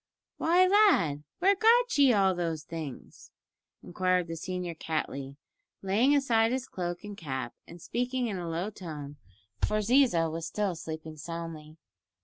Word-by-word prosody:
"Why, 350 +3 +4
lad, 365 - +4
where 390 +3 +4
got 475 +4 +4
ye 280 -3 +6
all 195 -4 +3
those 165 -3 -3
things?" 155 -5 -8 0.5
inquired 180 0 0
the 165 0 -6
senior 180 +1 -4
Cattley, 140 -4 -4 0.5
laying 225 +9 +3
aside 230 -5 +3
his 260 0 -2
cloak 175 -1 -4
and 205 -1 -7
cap, 135 -8 -5
and 170 - -11
speaking 250 +6 -2
in 200 -5 -3
a 170 -1 -4
low 175 +6 -2
tone, 150 -7 -8 0.5
for 210 - +2
Ziza 215 -6 +3
was 165 0 -4
still 200 +2 -1
sleeping 160 -1 -7
soundly. 165 -1 -7
180 Hz, 145 wpm, -29 LUFS, 160-245 Hz, 0.5 s, ye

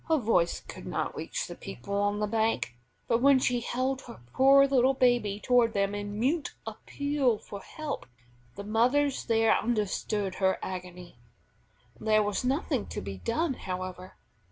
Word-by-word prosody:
Her 320 -1 +3
voice 195 - +1
could - - -10
not - - -2
reach - - -3
the - - -7
people 120 - -8
on 205 +1 +1
the 210 - 0
bank, 220 - 0 0.3
but 235 0 +2
when 275 0 +6
she 245 -1 +1
held 255 +3 -2
her 115 - -11
poor 275 +1 +6
little 265 -1 +3
baby 240 -6 +2
toward 245 -1 +3
them 200 0 0
in 205 0 -4
mute 290 +7 0
appeal 285 -5 -1
for 200 -1 -9
help, 310 +4 -6 0.5
the 200 - -6
mothers 250 +7 +1
there 225 -1 +3
understood 210 -3 -1
her 190 0 +3
agony. 180 -5 -7 0.8
There 215 -1 +3
was 205 +2 -1
nothing 265 -2 0
to - - -5
be 95 0 -7
done, 310 - 0
however. 185 -3 -6
225 Hz, 155 wpm, -29 LUFS, 200-260 Hz, 0.8 s, when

